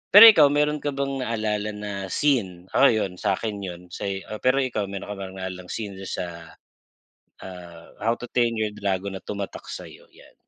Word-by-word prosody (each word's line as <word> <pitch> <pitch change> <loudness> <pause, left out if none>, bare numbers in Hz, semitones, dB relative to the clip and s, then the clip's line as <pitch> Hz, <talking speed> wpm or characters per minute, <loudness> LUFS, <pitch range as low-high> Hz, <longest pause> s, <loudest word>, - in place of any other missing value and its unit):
Pero 205 - +13
ikaw 155 -8 +6
meron 150 +1 +1
ka 145 -1 -3
bang 140 0 -2
naalala 105 -3 -1
na 105 0 -5 0.2
scene 95 -11 0
ako 140 - +5
'yon 110 -6 +1
sa'kin 105 +1 -1
'yon 90 -3 -6
sa'yo. 95 0 -4 0.2
Pero 130 +2 +3
ikaw 115 -5 -1
meron 100 +1 -6
ka - - -4
naalalang 95 -1 -7
scene 100 -1 -5
sa, 85 -2 -6 0.9
ah, 85 -3 -11
"How 115 +2 +1
to - - -9
Train 120 -2 +2
Your 110 -1 -1
dragon" 100 -1 -2
na - - -7
tumatak 100 0 -6
sa'yo? - - -9
'Yan. - - -19
105 Hz, 170 wpm, -25 LUFS, 95-120 Hz, 0.9 s, Pero